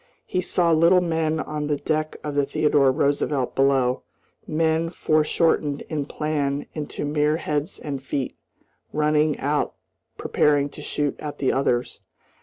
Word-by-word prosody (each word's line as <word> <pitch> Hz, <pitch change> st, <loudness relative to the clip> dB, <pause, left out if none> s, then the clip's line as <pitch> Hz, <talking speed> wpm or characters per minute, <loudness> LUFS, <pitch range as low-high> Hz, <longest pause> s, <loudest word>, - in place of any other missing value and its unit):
He 180 Hz, -, -1 dB
saw 175 Hz, -1 st, +1 dB
little 170 Hz, +3 st, +5 dB
men 160 Hz, -2 st, 0 dB
on 150 Hz, -1 st, -3 dB
the 145 Hz, -, +1 dB
deck 155 Hz, +1 st, -2 dB
of 150 Hz, -, -3 dB
the 145 Hz, 0 st, +2 dB
Theodore 140 Hz, -1 st, +3 dB
Roosevelt 140 Hz, -1 st, 0 dB
below, 135 Hz, -2 st, +2 dB, 0.5 s
men 160 Hz, +1 st, +1 dB
foreshortened 155 Hz, -2 st, +1 dB
in 150 Hz, -3 st, -2 dB
plan 145 Hz, -2 st, -1 dB
into 150 Hz, -1 st, -4 dB
mere 150 Hz, +1 st, +1 dB
heads 150 Hz, +1 st, -2 dB
and 140 Hz, -3 st, -5 dB
feet, 135 Hz, 0 st, -3 dB, 0.6 s
running 150 Hz, 0 st, +2 dB
out 145 Hz, +2 st, -1 dB, 0.4 s
preparing 145 Hz, -1 st, +2 dB
to 150 Hz, -, -11 dB
shoot 145 Hz, -1 st, -2 dB
at 150 Hz, -1 st, -6 dB
the 135 Hz, -, +1 dB
others. 125 Hz, -2 st, 0 dB
150 Hz, 140 wpm, -24 LUFS, 140-155 Hz, 0.6 s, little